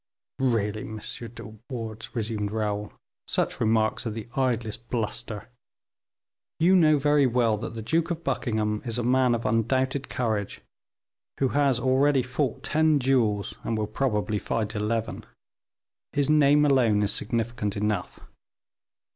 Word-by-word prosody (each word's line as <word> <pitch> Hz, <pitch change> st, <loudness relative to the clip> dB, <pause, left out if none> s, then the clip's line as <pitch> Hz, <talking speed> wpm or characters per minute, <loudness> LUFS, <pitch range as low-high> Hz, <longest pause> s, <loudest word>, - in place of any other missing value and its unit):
"Really, 110 Hz, -5 st, 0 dB
M. 110 Hz, 0 st, -6 dB
De 115 Hz, 0 st, -6 dB
Wardes," 115 Hz, -3 st, -6 dB
resumed 105 Hz, -2 st, -2 dB
Raoul, 105 Hz, -1 st, -2 dB, 0.4 s
"such -, -, -1 dB
remarks 110 Hz, +1 st, +1 dB
are -, -, 0 dB
the 110 Hz, +1 st, -6 dB
idlest 120 Hz, -3 st, -1 dB
bluster. 115 Hz, -1 st, -3 dB, 1.1 s
You 180 Hz, +4 st, +5 dB
know 155 Hz, -4 st, +5 dB
very 145 Hz, -1 st, +3 dB
well 115 Hz, -3 st, +2 dB
that 115 Hz, -, -6 dB
the 110 Hz, -, -5 dB
Duke 165 Hz, +8 st, +1 dB
of 170 Hz, -1 st, -3 dB
Buckingham 105 Hz, -3 st, -1 dB
is 115 Hz, -1 st, -2 dB
a 120 Hz, -, -1 dB
man 125 Hz, 0 st, +3 dB
of 115 Hz, -, -5 dB
undoubted 130 Hz, +5 st, 0 dB
courage, 110 Hz, -5 st, -2 dB, 0.8 s
who 135 Hz, -, +2 dB
has 140 Hz, -3 st, +2 dB
already 130 Hz, +1 st, +3 dB
fought 125 Hz, 0 st, -2 dB
ten 155 Hz, -1 st, +3 dB
duels, 120 Hz, -7 st, +1 dB
and 115 Hz, -, -1 dB
will 110 Hz, -, 0 dB
probably 105 Hz, -3 st, -1 dB
fight 110 Hz, 0 st, -2 dB
eleven. 110 Hz, +1 st, -2 dB, 0.9 s
His 145 Hz, +1 st, +2 dB
name 150 Hz, 0 st, +5 dB
alone 120 Hz, -7 st, +3 dB
is 100 Hz, -, +1 dB
significant 115 Hz, -3 st, -2 dB
enough. 105 Hz, -3 st, -2 dB
115 Hz, 140 wpm, -26 LUFS, 110-135 Hz, 1.1 s, You